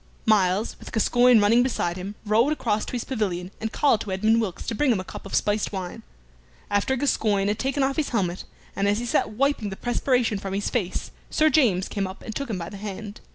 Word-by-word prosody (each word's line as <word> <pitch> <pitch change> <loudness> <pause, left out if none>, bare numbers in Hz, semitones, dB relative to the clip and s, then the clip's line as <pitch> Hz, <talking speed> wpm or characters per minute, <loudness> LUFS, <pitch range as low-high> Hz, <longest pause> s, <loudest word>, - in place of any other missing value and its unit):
Myles, 205 -1 +2
with - - -10
Gascoyne 245 +1 +5
running 215 +4 +5
beside 235 -9 0
him, 190 +3 -6
rode 225 +7 +3
across 220 -8 0
to - - -8
his 245 - -2
pavilion, 190 -7 -2
and 220 0 -2
called 275 -7 +2
to 205 - -5
Edmund 220 +4 +3
Wilkes 190 -5 -4
to - - -2
bring 270 +4 +2
him 215 - +1
a - - -4
cup 190 - -9
of - - -3
spiced 210 0 +1
wine. 185 -3 -5 0.7
After 205 +6 +1
Gascoyne 210 -7 +1
had 210 - -1
taken 270 +1 0
off 270 0 0
his 310 - 0
helmet, 185 -6 -1 0.3
and 200 0 +1
as 205 +1 +2
he 240 - -3
sat 240 - +1
wiping 270 -3 0
the 195 - -6
perspiration 245 -2 0
from 195 0 -4
his 200 - -2
face 205 -8 -2 0.2
Sir 310 0 +3
James 210 - +3
came 195 -2 -2
up 190 - -10
and 220 - -7
took 280 -2 -3
him 210 - -2
by 170 -1 -5
the 200 - -9
hand. 205 +1 -7
215 Hz, 230 wpm, -25 LUFS, 195-245 Hz, 0.7 s, Gascoyne